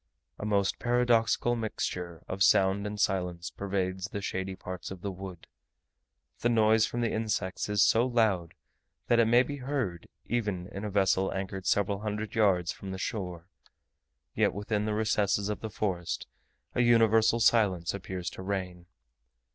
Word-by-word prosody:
A 105 - -3
most 100 -2 +1
paradoxical 120 -1 +2
mixture 90 -6 -4
of 95 +1 -5
sound 95 +2 +4
and 105 0 -6
silence 90 -3 -1
pervades 95 -1 -2
the 105 -1 -5
shady 95 -1 -3
parts 90 -1 -7
of 95 -2 -8
the 100 - -3
wood. 95 -2 -9 0.9
The 120 - +1
noise 110 -1 +4
from 120 - -3
the 115 - 0
insects 105 -4 -2
is 105 -1 +4
so 115 +4 +4
loud, 110 -9 +1 0.5
that 120 - +5
it 115 - +6
may 120 +2 +5
be 145 +2 -5
heard 130 - -3 0.2
even 105 -6 -2
in 100 -1 -7
a 105 - -2
vessel 95 -1 +2
anchored 95 0 -4
several 100 0 +1
hundred 105 0 -4
yards 95 -6 +2
from 95 - -9
the 95 - -4
shore; 90 -4 -4 0.9
yet - - +1
within 105 +1 -1
the 105 -1 -1
recesses 105 -2 +1
of 105 - -2
the 110 - -4
forest 95 -5 -2 0.5
a - - +1
universal 115 -1 +4
silence 100 -7 +3
appears 95 -2 -5
to - - -9
reign. 95 -2 -4
100 Hz, 160 wpm, -29 LUFS, 95-110 Hz, 0.9 s, it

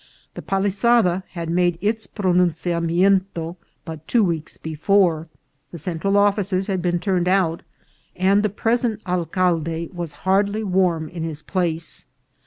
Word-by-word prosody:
The - - -7
Palisada 195 0 +2
had 170 -2 -4
made 175 -1 +1
ijs 215 0 -1
pronunciamento 180 -1 +1 0.3
but 160 -2 -8
two 235 -3 +3
weeks 165 -4 -2
before, 165 +1 +1 0.4
the 170 - -7
Central 180 +5 -1
officers 200 -2 +2
had 190 -3 -1
been 175 0 +1
turned 180 0 0
out, 180 -3 +2 0.5
and 195 +2 +3
the 210 - +1
present 225 +1 0
alcalde 170 -2 -1
was 170 -4 -5
hardly 200 +3 +2
warm 180 -5 +1
in 170 +1 -7
his 160 -2 -5
place. 170 -3 -2
180 Hz, 130 wpm, -22 LUFS, 170-195 Hz, 0.5 s, two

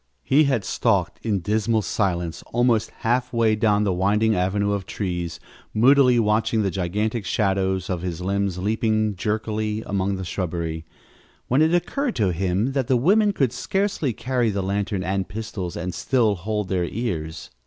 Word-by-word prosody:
He 150 +3 +4
had 125 -8 0
stalked, - - 0
in 105 -5 0
dismal 110 +3 +1
silence, 90 -6 -1
almost 120 -2 +2
half 125 +2 0
way 115 -2 +2
down 105 -1 +2
the 100 -3 +1
winding 105 +4 +2
avenue 100 +3 0
of 100 -2 -2
trees, 90 -4 -3 0.4
moodily 125 +2 +5
watching 110 0 +2
the 95 - 0
gigantic 105 +5 -1
shadows 95 -2 0
of 90 -3 -2
his 90 -2 -4
limbs 100 0 -1
leaping 110 +1 0
jerkily 110 +2 -2
among 100 0 -1
the 95 -1 -5
shrubbery, 85 -3 -3 0.6
when 130 +4 +3
it 160 +2 +4
occurred 255 +8 -1
to 100 -5 +1
him 95 +7 0
that 135 -3 -1
the 130 - +3
women 205 - +4
could 135 - 0
scarcely 195 -4 -1
carry 120 +1 0
the 100 -2 -2
lantern 100 0 -1
and 95 0 -1
pistols 105 -4 -5
and 90 +1 -4
still 115 +2 +2
hold 105 +2 -3
their 90 -2 0
ears. 85 -7 -4
105 Hz, 165 wpm, -23 LUFS, 95-115 Hz, 0.6 s, moodily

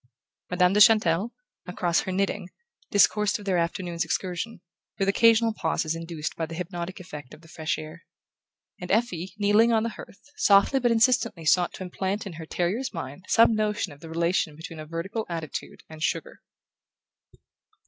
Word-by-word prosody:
Madame 180 +1 +3
de 210 - +3
Chantelle, 210 -2 +5 0.4
across 175 -1 0
her 190 - -3
knitting, 195 0 -1 0.4
discoursed 210 +1 +3
of 205 - -12
their 185 -3 +1
afternoon's 170 0 -2
excursion, 185 +4 -3 0.4
with 195 - 0
occasional 230 +2 +4
pauses 160 -6 -1
induced 165 -2 -5
by 160 - -3
the 165 - -7
hypnotic 175 +1 -5
effect 150 -7 -9
of - - -20
the 165 - -17
fresh 160 -1 -3
air; 155 +3 -9 0.8
and 180 - -7
Effie, 190 -4 0
kneeling, 210 +3 +4
on 220 -1 +3
the 230 - -1
hearth, 230 +5 -13
softly 200 +7 +4
but 245 -2 +2
insistently 230 -6 +2
sought 175 +3 +3
to - - -6
implant 190 +3 -3
in 195 - -6
her 160 0 -9
terrier's 195 +12 -1
mind 145 +8 -7
some 230 0 +5
notion 210 -6 -1
of 145 - -17
the 165 - -11
relation 170 -1 0
between 160 +1 -9
a 155 - -8
vertical 185 +8 -4
attitude 165 -3 -6
and 160 0 -12
sugar. 165 -1 -2
180 Hz, 170 wpm, -26 LUFS, 165-210 Hz, 0.8 s, Chantelle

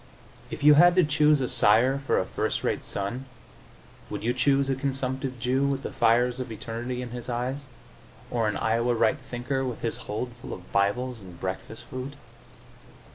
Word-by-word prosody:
If - - -6
you 150 0 +9
had 175 +4 +7
to 185 - +6
choose 150 -1 +4
a 130 - 0
sire 125 +3 +4
for 135 - 0
a 95 - +1
first - - -2
rate - - -1
son, 100 +7 -3 0.8
would - - -5
you 120 +2 +1
choose 135 +2 +2
a 135 - +1
consumptive 130 -1 -3
Jew 130 +4 +1
with 135 -1 -1
the - - -4
fires 120 +2 +3
of 125 -2 -5
eternity 120 +3 -4
in 120 - -7
his 120 0 -7
eyes, 125 +4 -2 0.7
or 115 -2 +1
an 100 -2 -1
Iowa 115 +2 +1
right 115 -1 +2
thinker 130 +2 -2
with 125 -3 -4
his 115 - -1
hold 115 +4 -3
full - - -6
of 90 0 -11
Bibles 115 +4 0
and 90 -3 -12
breakfast 95 +4 -5
food? 130 +2 -7
125 Hz, 185 wpm, -27 LUFS, 115-135 Hz, 0.8 s, you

